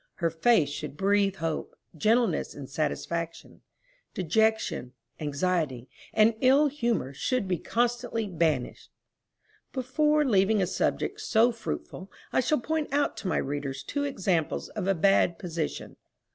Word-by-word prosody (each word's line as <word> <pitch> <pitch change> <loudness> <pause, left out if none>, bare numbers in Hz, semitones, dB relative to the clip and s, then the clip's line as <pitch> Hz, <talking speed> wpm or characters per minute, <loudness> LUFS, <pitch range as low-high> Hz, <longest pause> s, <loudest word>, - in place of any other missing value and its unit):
Her 165 -2 0
face 165 -2 +3
should 145 0 -6
breathe 200 +1 +2
hope, 165 -3 -3 0.2
gentleness 225 +8 +1
and 140 -2 -8
satisfaction; 165 +3 -3 0.5
dejection, 190 - +1 0.3
anxiety, 145 -4 -1 0.2
and 220 +1 +4
ill 270 +4 +5
humor 235 - -1
should 235 - -1
be 180 -3 0
constantly 235 -1 -1
banished. 160 -8 -1 0.8
Before 300 +4 +2
leaving 210 -3 +3
a 190 - +3
subject 415 - -1
so 240 - +3
fruitful, 185 - -6 0.2
I - - +3
shall 280 +3 +2
point 315 +1 -2
out 285 +1 +1
to 195 - -5
my - - +1
readers 135 -1 -3
two 285 - -2
examples 190 - -1
of 200 -3 -4
a 195 - +3
bad 175 -1 +3
position. 165 -3 -4
195 Hz, 130 wpm, -28 LUFS, 155-240 Hz, 0.8 s, ill